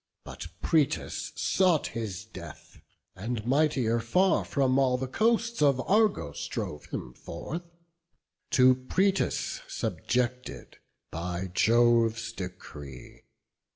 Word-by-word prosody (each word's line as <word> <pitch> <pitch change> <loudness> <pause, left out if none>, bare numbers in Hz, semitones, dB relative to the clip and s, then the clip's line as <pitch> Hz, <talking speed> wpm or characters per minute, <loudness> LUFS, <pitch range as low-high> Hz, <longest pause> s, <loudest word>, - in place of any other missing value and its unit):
But - - -8 0.2
Proetus 155 -5 0
sought 180 -5 +2
his 105 -3 -5
death; 90 -7 -12 0.3
and, 110 +3 -4
mightier 130 -4 +2
far, 180 +12 +2
From 135 -2 +1
all 130 -2 +3
the 130 +1 -3
coasts 230 - +1
of 140 -3 +4
Argos 200 - +1
drove 75 0 -5
him 60 - -6
forth, 165 - -6 0.9
To 130 0 +7
Proetus 185 +10 0
subjected 125 +1 -3 0.3
by 90 +2 -4
Jove's 115 0 +3
decree. 75 - -9
125 Hz, 100 wpm, -28 LUFS, 100-150 Hz, 0.9 s, To